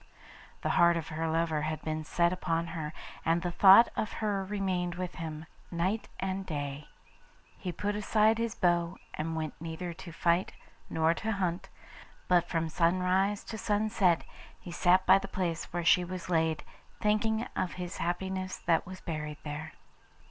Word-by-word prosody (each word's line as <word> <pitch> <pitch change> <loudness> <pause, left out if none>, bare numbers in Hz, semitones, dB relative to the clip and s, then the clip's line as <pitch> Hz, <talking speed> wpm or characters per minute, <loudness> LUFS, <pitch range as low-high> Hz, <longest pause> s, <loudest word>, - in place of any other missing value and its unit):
The - - 0
heart 170 0 +6
of 165 - -5
her 160 +1 -2
lover 160 -1 +1
had 155 +1 -2
been 155 0 -2
set 170 +3 +2
upon 170 -2 -1
her, 155 -3 -4 0.3
and 165 +1 +1
the 175 - -1
thought 195 +6 +8
of 215 - -2
her 205 -3 -1
remained 185 -3 -1
with 180 0 -4
him 160 -1 -5 0.2
night 185 +6 -1
and 190 0 -2
day. 145 -3 -4 0.7
He 180 - -3
put 205 +4 -2
aside 215 +1 +3
his 230 -1 -1
bow, 175 -1 +1 0.2
and 160 +1 -3
went 155 -2 -3
neither 165 +1 -5
to 170 +1 -10
fight 170 +2 +1 0.4
nor 160 +1 +2
to 220 +5 -2
hunt, 180 -3 -2 0.6
but 175 -1 +3
from 165 -1 0
sunrise 185 +5 +2
to 220 - -7
sunset 205 -5 +2 0.4
he 175 - -9
sat 185 +2 +3
by 190 +1 +7
the 195 - -6
place 175 -4 -2
where 175 -1 -2
she 180 - +6
was 180 0 -6
laid, 160 -2 +1 0.4
thinking 220 +2 +1
of 185 -2 -1
his 180 -1 -6
happiness 185 +2 -2
that 165 -1 +1
was 185 0 -9
buried 150 -3 -4
there. 150 +1 -6
175 Hz, 165 wpm, -30 LUFS, 165-190 Hz, 0.7 s, thought